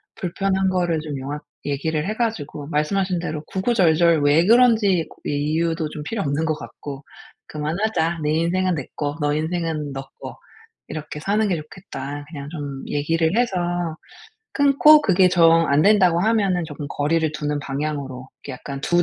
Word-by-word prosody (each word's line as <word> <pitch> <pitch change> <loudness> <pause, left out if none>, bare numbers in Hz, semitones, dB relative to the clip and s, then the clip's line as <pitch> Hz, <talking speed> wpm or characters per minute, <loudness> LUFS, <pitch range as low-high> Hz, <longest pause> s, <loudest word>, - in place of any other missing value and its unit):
불편한 190 +1 0
거를 175 -4 0
좀 150 -2 -5
명확히 140 +2 -5 0.2
얘기를 150 +3 -1
해 215 - -1
가지고 160 -11 -3
말씀하신 180 +4 0
대로 155 -3 -4
구구절절 175 -6 +3
왜 150 +4 +4
그런지 220 -7 +4
고 - - -17
이유도 155 +2 -1
좀 150 0 -7
필요 205 +7 -3
없는 145 +3 -1
것 155 - +1
같고 140 -1 -9 0.4
"그만하자. 165 +2 -1
내 150 - +1
인생은 180 +3 +1
내 140 -4 -5
꺼 145 +1 -3
너 145 0 +1
인생은 160 -2 -2
너 135 0 -5 0.2
꺼 - - -8 0.5
이렇게 150 -1 -6
사는 210 +6 +1
게 185 - +1
좋겠다." 145 -3 -8
그냥 145 -3 -7
좀 145 -4 -6
얘기를 160 +5 0
해서 240 -5 +1 1.0
끊고 285 +2 +6
그게 190 -6 +4
정 165 -2 +5
안된다고 180 +4 +4
하면은 200 -5 +1
조금 150 -2 -7
거리를 155 +2 0
두는 150 -1 -2
방향으로 140 -2 -4
이렇게 140 - -7
약간 135 +2 -7
2 175 0 +3
160 Hz, 325 characters per minute, -22 LUFS, 150-185 Hz, 1.0 s, 끊고